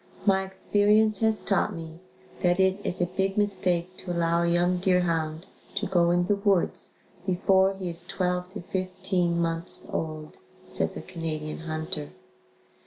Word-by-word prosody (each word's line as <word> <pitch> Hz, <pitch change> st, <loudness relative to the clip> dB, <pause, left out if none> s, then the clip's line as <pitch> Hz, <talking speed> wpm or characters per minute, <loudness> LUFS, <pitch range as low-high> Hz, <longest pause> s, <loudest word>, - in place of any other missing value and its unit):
My 190 Hz, -2 st, +4 dB
experience 205 Hz, +2 st, +2 dB
has 220 Hz, -1 st, +2 dB
taught 200 Hz, 0 st, 0 dB
me 165 Hz, 0 st, -8 dB, 0.4 s
that 175 Hz, +1 st, +2 dB
it 190 Hz, +1 st, +3 dB
is 180 Hz, -, -3 dB
a -, -, +4 dB
big 190 Hz, +2 st, -2 dB
mistake 185 Hz, -3 st, 0 dB
to 180 Hz, -, -6 dB
allow 170 Hz, 0 st, +1 dB
a 170 Hz, -, +1 dB
young 175 Hz, +1 st, +2 dB
deer 180 Hz, 0 st, +3 dB
hound 165 Hz, -1 st, -1 dB, 0.3 s
to 205 Hz, +1 st, -1 dB
go 175 Hz, -3 st, +3 dB
in 175 Hz, 0 st, +2 dB
the 205 Hz, +2 st, +1 dB
woods 200 Hz, -3 st, 0 dB, 0.3 s
before 190 Hz, +1 st, +3 dB
he 190 Hz, -1 st, -5 dB
is 170 Hz, 0 st, -5 dB
12 180 Hz, -1 st, -2 dB
to 205 Hz, -, -4 dB
15 185 Hz, -1 st, -1 dB
months 165 Hz, 0 st, 0 dB
old, 155 Hz, -1 st, -4 dB, 0.3 s
says -, -, +3 dB
a -, -, -7 dB
Canadian 155 Hz, -3 st, -5 dB
hunter. 155 Hz, -, -3 dB
180 Hz, 160 wpm, -27 LUFS, 170-190 Hz, 0.4 s, My